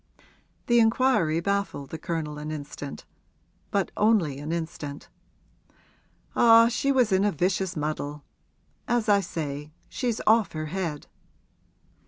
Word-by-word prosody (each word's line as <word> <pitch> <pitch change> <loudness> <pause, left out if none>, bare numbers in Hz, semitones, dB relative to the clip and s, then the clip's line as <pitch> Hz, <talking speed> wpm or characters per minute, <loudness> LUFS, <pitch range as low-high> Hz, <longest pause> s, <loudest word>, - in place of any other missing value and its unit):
The 240 0 +4
inquiry 225 -8 +3
baffled 200 -7 -2
the 160 - -5
Colonel 155 -4 -4
an 150 +1 -6
instant 145 -2 -7 0.6
but 200 -1 0
only 200 -11 +2
an 150 +2 -5
instant. 160 -4 -5 1.3
'Ah, 230 0 +7
she 275 +4 0
was 250 -5 +3
in 190 +1 +3
a 205 - +2
vicious 180 +1 -1
muddle! 150 -1 -3 0.6
As 240 -2 +1
I 205 -1 +5
say, 150 -4 -5 0.2
she's 240 -4 -2
off 220 -1 +4
her 155 -1 -3
head.' 170 -6 -3
175 Hz, 125 wpm, -26 LUFS, 150-220 Hz, 1.3 s, Ah